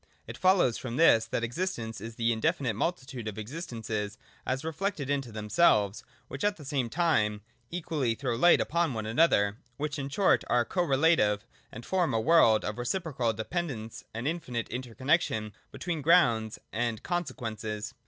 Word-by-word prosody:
It - - -8
follows 185 - +3
from 120 -2 -5
this 135 -9 +5
that 120 - -2
existence 120 - -3
is 115 +1 -7
the 115 0 +1
indefinite 115 +1 0
multitude 130 - -3
of 105 - -4
existents 115 -1 -6 0.6
as 130 +4 -1
reflected 160 -3 -2
into 135 -4 -1
themselves, 105 - +2 0.2
which 135 - -6
at 205 0 +1
the 150 - -11
same 135 -4 -1
time 110 -10 +1 0.3
equally 155 -9 -1
throw 125 -1 -2
light 175 +9 +5
upon 170 -5 0
one 110 -1 -3
another, 110 -5 +3
— 120 - -40
which, 150 0 -3
in 135 0 -4
short, 190 +7 +3
are 120 -1 +3
co 180 - -1
relative, 135 -9 +3 0.3
and 115 +2 -9
form 180 -9 +1
a - - +2
world 115 -5 +5
of 105 +2 -4
reciprocal 130 -3 -1
depend 165 +11 -3
ence 110 -3 -7
and 115 +2 -5
of 150 - +2
infinite 125 -9 -4
interconnexion 125 - -1 0.2
between 170 -4 -4
grounds 120 -9 +3 0.2
and 115 -1 -2
consequents. 115 - -4
125 Hz, 165 wpm, -29 LUFS, 110-165 Hz, 0.6 s, this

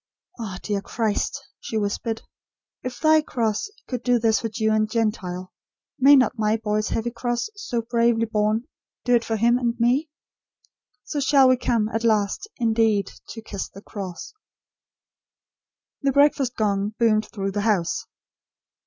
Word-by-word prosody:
"Ah, 200 -5 -5
dear 205 -2 -1
Christ!" 220 +1 -1 0.2
she 220 - -4
whispered. 220 +2 -2 0.6
"If 250 -1 -6
Thy 315 0 +5
cross 230 - -1 0.2
could 250 -3 -3
do 245 0 +3
this 225 -1 +2
for 225 - -3
Jew 220 0 0
and 215 0 +2
Gentile, 195 -5 -2 0.5
may 275 +2 +8
not 255 -3 +3
my 215 +1 +2
boy's 215 -1 -1
heavy 235 +1 -1
cross, 240 - -2
so 245 - -3
bravely 235 -1 +2
borne, 215 +1 0 0.4
do 245 - +3
it 235 -1 +4
for 225 - -2
him 235 +3 +3
and 240 -1 -1
for 230 - 0
me? 270 +6 +2 0.9
So 290 - -3
shall 275 -1 +5
we 255 - +5
come 235 -3 0
at 225 0 -2
last, 215 - +1
indeed, 225 -4 +2 0.2
to 225 - -8
'kiss 200 -3 -5
the 195 - -13
cross.'" 195 - -7 1.7
The 275 -2 +2
breakfast 280 -2 +3
gong 205 0 0
boomed 220 -2 +2
through 195 -2 -3
the 205 +1 -2
house. 200 -6 0
225 Hz, 155 wpm, -24 LUFS, 210-245 Hz, 1.7 s, may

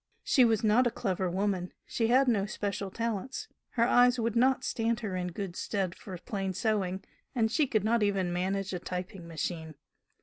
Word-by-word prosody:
She 260 - +4
was 225 -2 +2
not 225 +4 +4
a - - +3
clever 190 -4 -1
woman, 185 -1 -1
she 225 - 0
had 260 +3 +4
no 205 -5 +2
special 200 -1 -3
talents, 230 - -3 0.3
her 230 - +2
eyes 245 0 +5
would 230 0 0
not 260 +2 +3
stand 230 0 0
her 200 -5 -3
in 180 -1 -2
good 180 0 -5
stead 190 -3 -2
for 185 -1 -8
plain 195 -1 -3
sewing, 195 -3 -1 0.3
and 225 -2 +2
she 295 +3 +2
could 215 -5 +1
not 230 +2 +2
even 195 -4 +1
manage 190 +2 -1
a 180 - -2
typing 180 0 -6
machine. 160 -1 -4
205 Hz, 190 wpm, -30 LUFS, 185-230 Hz, 0.3 s, eyes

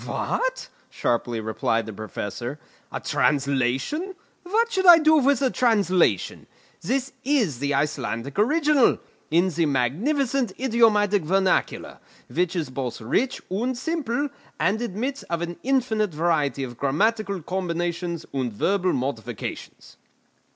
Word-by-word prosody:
"What!" - - -2 0.2
sharply 120 -1 -1
replied 110 +1 -1
the 110 - -7
Professor, 110 +5 -5 0.3
"a - - -3
translation! 140 - 0 0.3
What 455 +6 0
should 380 -4 +1
I 345 -1 +11
do 315 -1 +5
with 280 -1 +2
a 260 - +2
translation? 195 - +1 0.3
This 265 +7 -1
is 235 - +1
the 140 +1 0
Icelandic 140 - -2
original, 295 +2 +4 0.3
in 175 +4 +3
the 165 -1 0
magnificent 235 - 0
idiomatic 220 -5 +3
vernacular, 190 +4 0 0.3
which 180 0 0
is 155 -6 -2
both 130 -2 -4
rich 235 - -1
and 240 +6 -1
simple, 285 -1 -2 0.3
and 190 +8 +1
admits 240 +5 -3
of 170 0 -1
an 175 0 -5
infinite 225 - 0
variety 150 -5 +1
of 120 -2 -7
grammatical 200 +8 +1
combinations 175 -1 -3
and 130 -3 -1
verbal 185 - +1
modifications." 120 -4 -5
185 Hz, 125 wpm, -24 LUFS, -, 0.3 s, I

